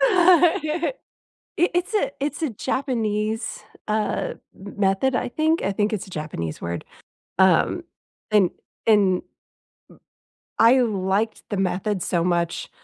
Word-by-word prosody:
I 345 -4 +4 0.6
it's 355 +4 0
a 415 - +1
it's 290 +3 -3
a 310 - 0
Japanese, 225 -3 -2 0.3
uh, 215 0 -1 0.2
m 200 +1 -11
method, 200 +7 +2
I - - 0
think 315 +3 +1
I 195 - 0
think 210 +2 0
it's 205 - -3
a - - -13
Japanese 85 - -5
word, 85 0 -4 0.5
um, 190 - +3 0.5
and 205 -4 +4 0.4
and 200 -4 +4
m - - -11 1.4
I 245 +3 +6
liked 205 -1 0
the 205 - -1
method 190 0 -1
so 170 -1 0
much 170 -1 -1
215 Hz, 125 wpm, -23 LUFS, 190-300 Hz, 1.4 s, I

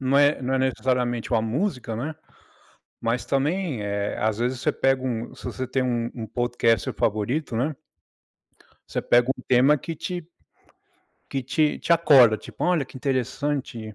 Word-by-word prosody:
Não 135 +1 +2
é 145 -1 +4
não 130 +1 0
é 135 - +2
necessariamente 125 -2 0
uma 115 - +4
música, 125 - -2
né, 150 +6 -4 0.9
mas 115 +2 -1
também, 145 - 0
eh, 100 0 -2
às 110 -1 0
vezes 125 +1 -1
você 150 - +1
pega 135 -1 +1
um, 120 -2 -3
se - - -14
você 130 - -4
tem 130 +1 0
um 120 -2 -1
um 115 -3 -5
podcast 115 -1 +1
favorito, 115 +6 -1
né. 140 +7 0 1.1
Você - - -2
pega 120 +1 +3
um 125 - -3
tema 135 +4 +5
que 165 +3 -6
te 175 0 -5 1.0
que 135 - -2
te 150 +4 +1
te - - +1
acorda, 135 -9 +6
tipo: - - -7
"Olha 175 -5 +2
que 130 - -13
interessante." 130 -3 -2
130 Hz, 165 wpm, -24 LUFS, 115-145 Hz, 1.1 s, acorda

